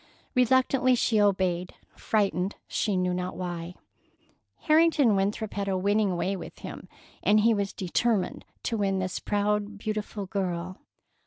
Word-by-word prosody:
Reluctantly 255 Hz, 0 st, +3 dB
she 225 Hz, -3 st, +2 dB
obeyed, 185 Hz, -3 st, +1 dB, 0.2 s
frightened, 195 Hz, -3 st, 0 dB
she 205 Hz, -3 st, 0 dB
knew 180 Hz, 0 st, +1 dB
not 180 Hz, 0 st, -3 dB
why. 175 Hz, -1 st, -5 dB, 0.9 s
Harrington 310 Hz, -7 st, +4 dB
Winthrop 200 Hz, +2 st, -1 dB
had 200 Hz, -1 st, -2 dB
a 190 Hz, -1 st, 0 dB
winning 200 Hz, -1 st, +1 dB
way 190 Hz, +3 st, -1 dB
with 185 Hz, -, -9 dB
him, -, -, -9 dB, 0.3 s
and 210 Hz, +1 st, +4 dB
he 230 Hz, +2 st, +4 dB
was 200 Hz, -2 st, -1 dB
determined 200 Hz, +2 st, 0 dB, 0.2 s
to 230 Hz, -, -1 dB
win 195 Hz, -2 st, +1 dB
this 185 Hz, -1 st, -2 dB
proud, 205 Hz, 0 st, -1 dB
beautiful 210 Hz, -1 st, -4 dB
girl. 185 Hz, -2 st, -3 dB
200 Hz, 140 wpm, -27 LUFS, 185-215 Hz, 0.9 s, Harrington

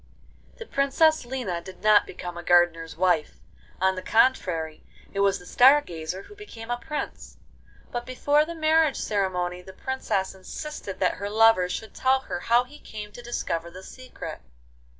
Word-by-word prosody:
XVI -, -, -27 dB
The 460 Hz, -, -8 dB
Princess 310 Hz, -, +2 dB
Lina 240 Hz, -10 st, -3 dB
did 185 Hz, +1 st, -12 dB
not 215 Hz, -1 st, +5 dB
become 175 Hz, -1 st, -7 dB
a 175 Hz, -, -6 dB
gardener's 170 Hz, -2 st, +2 dB
wife; 175 Hz, -4 st, +1 dB, 0.4 s
on 190 Hz, +1 st, +3 dB
the 185 Hz, -, -5 dB
contrary, 180 Hz, -11 st, +1 dB, 0.3 s
it 200 Hz, -, -3 dB
was 200 Hz, -1 st, +3 dB
the 180 Hz, -, -14 dB
Star 265 Hz, +9 st, +6 dB
Gazer 175 Hz, -, -6 dB
who -, -, -14 dB
became 240 Hz, -, -9 dB
a 240 Hz, -, 0 dB
Prince: 300 Hz, +4 st, -6 dB, 0.5 s
but 240 Hz, 0 st, -3 dB
before 285 Hz, +4 st, +2 dB
the 335 Hz, +2 st, -6 dB
marriage 315 Hz, -2 st, +3 dB
ceremony 180 Hz, -3 st, -1 dB
the 190 Hz, +1 st, -12 dB
Princess 200 Hz, -5 st, -2 dB
insisted 195 Hz, +2 st, -7 dB
that 185 Hz, -, +2 dB
her 200 Hz, +1 st, -4 dB
lover 220 Hz, -4 st, +5 dB
should 220 Hz, +3 st, -5 dB
tell 260 Hz, 0 st, +2 dB
her 265 Hz, 0 st, -5 dB
how 240 Hz, -1 st, +3 dB
he 290 Hz, +4 st, -15 dB
came 210 Hz, -1 st, -8 dB
to 240 Hz, -, -10 dB
discover 170 Hz, -8 st, -3 dB
the 185 Hz, +2 st, -11 dB
secret. 255 Hz, +5 st, -9 dB
210 Hz, 170 wpm, -26 LUFS, 180-265 Hz, 0.5 s, Star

